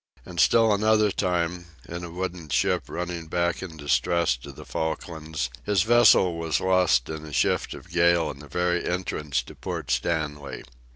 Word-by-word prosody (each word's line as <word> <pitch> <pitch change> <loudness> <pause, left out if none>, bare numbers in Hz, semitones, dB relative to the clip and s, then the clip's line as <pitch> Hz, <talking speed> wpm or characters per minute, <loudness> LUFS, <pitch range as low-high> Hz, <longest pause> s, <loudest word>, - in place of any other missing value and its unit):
And - - -7
still 115 -2 +5
another 110 0 +3
time, 90 -1 -1 0.2
in 85 +1 -6
a 85 - -6
wooden 90 -2 -5
ship - - +1
running 85 -1 -4
back 85 +1 0
in 85 -4 -8
distress 75 0 +1
to 70 +3 -10
the 65 - -12
Falklands, 80 -4 -3
his 100 -4 +2
vessel 110 -7 +5
was 80 -1 0
lost 90 -8 +3
in 80 -1 -6
a 75 - -9
shift 70 - 0
of 90 - -13
gale 85 -1 +3
in 70 - -12
the 75 - -11
very 90 +3 0
entrance 75 -7 -2
to - - -12
Port - - -5
Stanley. 75 -4 -2
85 Hz, 170 wpm, -25 LUFS, 80-90 Hz, 0.2 s, still